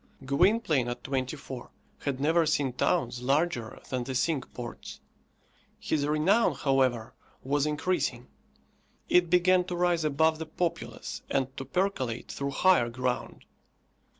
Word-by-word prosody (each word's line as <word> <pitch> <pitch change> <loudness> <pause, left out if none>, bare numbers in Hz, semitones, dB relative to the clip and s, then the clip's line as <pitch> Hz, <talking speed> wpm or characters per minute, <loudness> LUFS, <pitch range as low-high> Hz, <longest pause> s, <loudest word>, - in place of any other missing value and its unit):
Gwynplaine 155 - +2
at 120 0 -5
twenty 135 +1 -2
four 130 -3 -8 0.4
had 140 -2 -1
never 160 +3 +3
seen 140 -4 +1
towns 125 -1 0
larger 135 -3 0
than 130 -1 -1
the 130 +1 -5
Cinque 145 +1 0
Ports. 120 -1 -8 0.8
His 145 -2 -1
renown, 165 +5 +3
however, 130 -4 +1 0.3
was 145 +2 +1
increasing. 150 -5 -1 0.8
It 175 -1 +4
began 180 +1 +4
to 180 -1 -4
rise 175 -2 +1
above 155 +2 +2
the 160 - -5
populace, 170 +1 -4
and 135 0 -1
to 135 - -6
percolate 130 -8 -2
through 140 0 -3
higher 140 -4 +3
ground. 125 +1 -3
140 Hz, 130 wpm, -28 LUFS, 130-170 Hz, 0.8 s, It